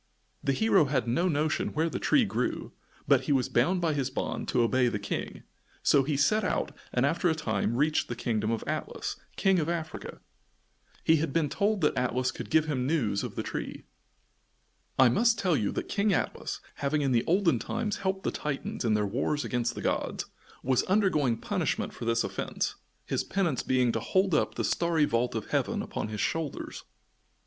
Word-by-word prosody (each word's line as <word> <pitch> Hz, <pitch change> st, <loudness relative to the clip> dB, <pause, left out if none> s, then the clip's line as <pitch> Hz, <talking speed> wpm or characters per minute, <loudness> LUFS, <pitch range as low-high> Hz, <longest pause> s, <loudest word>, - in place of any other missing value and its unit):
The 135 Hz, -, +2 dB
hero 195 Hz, -1 st, +4 dB
had 135 Hz, -3 st, 0 dB
no 150 Hz, +10 st, +2 dB
notion 155 Hz, -1 st, 0 dB
where 160 Hz, +2 st, +2 dB
the 165 Hz, -, -3 dB
tree -, -, +3 dB
grew, -, -, -2 dB, 0.4 s
but -, -, +4 dB
he -, -, 0 dB
was 130 Hz, -3 st, +2 dB
bound 175 Hz, +10 st, +2 dB
by 165 Hz, -2 st, +1 dB
his 135 Hz, -3 st, -1 dB
bond 130 Hz, -, -3 dB
to 120 Hz, -, +2 dB
obey 125 Hz, +2 st, +3 dB
the 110 Hz, -, 0 dB
King, 100 Hz, -, -4 dB, 0.4 s
so 140 Hz, -, +5 dB
he 140 Hz, +1 st, -1 dB
set 215 Hz, +10 st, +3 dB
out 185 Hz, -, -1 dB, 0.2 s
and 125 Hz, +2 st, +2 dB
after 170 Hz, +4 st, +2 dB
a 160 Hz, -, +1 dB
time 115 Hz, -7 st, -1 dB
reached 150 Hz, +4 st, +2 dB
the 120 Hz, -, -4 dB
kingdom 110 Hz, -2 st, -1 dB
of 115 Hz, -1 st, -1 dB
Atlas, -, -, -3 dB, 0.2 s
King 190 Hz, -2 st, +3 dB
of 160 Hz, 0 st, -1 dB
Africa. 165 Hz, -2 st, -4 dB, 0.8 s
He 160 Hz, -, +5 dB
had 155 Hz, -1 st, -1 dB
been 155 Hz, 0 st, +1 dB
told 205 Hz, +3 st, 0 dB
that 150 Hz, -, +2 dB
Atlas 125 Hz, 0 st, 0 dB
could -, -, -7 dB
give 160 Hz, -1 st, +4 dB
him 130 Hz, -5 st, -1 dB
news 120 Hz, -10 st, +1 dB
of -, -, -5 dB
the -, -, -2 dB
tree. -, -, -5 dB, 1.1 s
I 130 Hz, -, +7 dB
must 230 Hz, -, +3 dB
tell 180 Hz, -4 st, +2 dB
you 105 Hz, -, 0 dB
that -, -, -3 dB
King 205 Hz, 0 st, +1 dB
Atlas, 180 Hz, -, -2 dB, 0.2 s
having 145 Hz, +1 st, 0 dB
in 135 Hz, -, +1 dB
the 120 Hz, -1 st, +3 dB
olden 170 Hz, -, +3 dB
time 220 Hz, -, -2 dB
helped 190 Hz, -1 st, -2 dB
the -, -, 0 dB
Titans 140 Hz, -3 st, -4 dB
in 110 Hz, -3 st, +2 dB
their 105 Hz, -1 st, +1 dB
wars 130 Hz, +6 st, -1 dB
against 120 Hz, 0 st, -1 dB
the -, -, -5 dB
gods, -, -, -1 dB, 0.4 s
was 130 Hz, -1 st, +3 dB
undergoing 170 Hz, -, +2 dB
punishment -, -, -2 dB
for -, -, -7 dB
this 115 Hz, 0 st, +2 dB
offence, -, -, -2 dB, 0.3 s
his -, -, -1 dB
penance 180 Hz, -8 st, 0 dB
being 125 Hz, -2 st, +2 dB
to -, -, -1 dB
hold 190 Hz, -1 st, +1 dB
up 150 Hz, -, +1 dB
the -, -, -1 dB
starry 170 Hz, -3 st, +2 dB
vault 120 Hz, -2 st, 0 dB
of 110 Hz, -, -4 dB
heaven -, -, 0 dB
upon -, -, -4 dB
his 105 Hz, -1 st, -4 dB
shoulders. 160 Hz, -4 st, -3 dB
145 Hz, 195 wpm, -29 LUFS, 120-170 Hz, 1.1 s, I